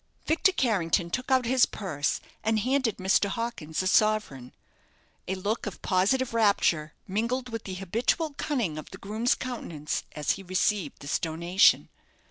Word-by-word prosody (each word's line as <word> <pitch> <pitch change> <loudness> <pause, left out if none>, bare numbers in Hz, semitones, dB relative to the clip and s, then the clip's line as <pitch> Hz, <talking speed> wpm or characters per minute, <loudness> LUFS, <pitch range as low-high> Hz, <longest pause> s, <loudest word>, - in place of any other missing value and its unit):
Victor 330 +4 +3
Carrington 180 - +1
took 255 +6 -3
out 260 -2 +3
his 255 +1 +4
purse, 155 -8 -2 0.2
and 220 0 +2
handed 255 -2 +1
Mr. 195 +1 +2
Hawkins 195 -8 -3
a - - 0
sovereign. 205 - +1 0.8
A 190 - -1
look 205 +4 -2
of 200 - -6
positive 230 +8 +1
rapture 200 -8 +2
mingled 235 +6 -1
with 225 -2 -6
the 190 - -5
habitual 230 - -1
cunning 255 - -2
of 155 - -10
the 190 - -10
groom's 220 +5 0
countenance 170 - -4
as 150 -1 0
he 195 - -3
received 185 0 -1
this 140 - -1
donation. 170 +4 +3
205 Hz, 150 wpm, -27 LUFS, 175-240 Hz, 0.8 s, his